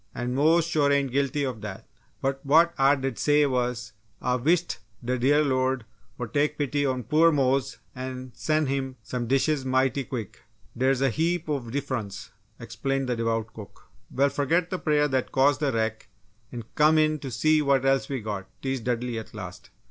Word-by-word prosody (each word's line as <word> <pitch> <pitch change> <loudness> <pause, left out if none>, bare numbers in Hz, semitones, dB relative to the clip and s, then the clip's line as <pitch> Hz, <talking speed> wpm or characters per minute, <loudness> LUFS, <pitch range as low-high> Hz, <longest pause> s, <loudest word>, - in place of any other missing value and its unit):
And 125 0 -3
Mose 160 +5 +3
sure 150 -4 +2
ain't 140 -2 +1
guilty 140 +2 0
of 125 -5 -3
dat! 100 -2 -7 0.4
But, 135 0 -1
what 165 +4 +4
Ah 135 +1 +5
did 135 -3 -4
say 150 0 +4
was 125 -3 -2 0.3
'Ah 125 0 0
wisht 165 +6 +1 0.3
de 125 +1 -1
dear 145 +5 +4
Lord 130 -3 0 0.3
woul' 120 -2 -5
take 150 +5 0
pity 145 0 0
on 130 -1 -1
poor 160 +7 +4
Mose 135 -2 +1 0.2
an' 130 0 -6
sen' 155 0 0
him 135 -1 -2
some 120 -2 -4
dishes 135 +2 +1
mighty 130 +1 +1
quick! 115 -5 -6 0.3
Dere's 130 +1 +1
a 135 -2 +3
heap 165 +4 -1
ov 140 -5 -2
diffrunce," 125 -7 -4 0.3
explained 135 -1 -3
the 125 - +1
devout 115 -1 -2
cook. 105 -3 -13 0.2
"Well, 140 +2 +2
forget 165 +6 0
the 185 - -2
prayer 150 -2 +2
that 130 -3 -1
caused 135 +1 +3
the 145 -3 +1
wreck, 110 -1 -2 0.4
and 120 -3 -7
come 155 +1 +4
in 155 0 +2
to 135 - -6
see 155 +6 +2
what 140 -2 +2
else 135 0 +2
we 135 -3 -3
got," 100 -3 -5
teased 135 -3 -2
Dudley, 120 -1 -1
at 110 - -11
last. 90 -3 -9
135 Hz, 185 wpm, -26 LUFS, 125-145 Hz, 0.4 s, Ah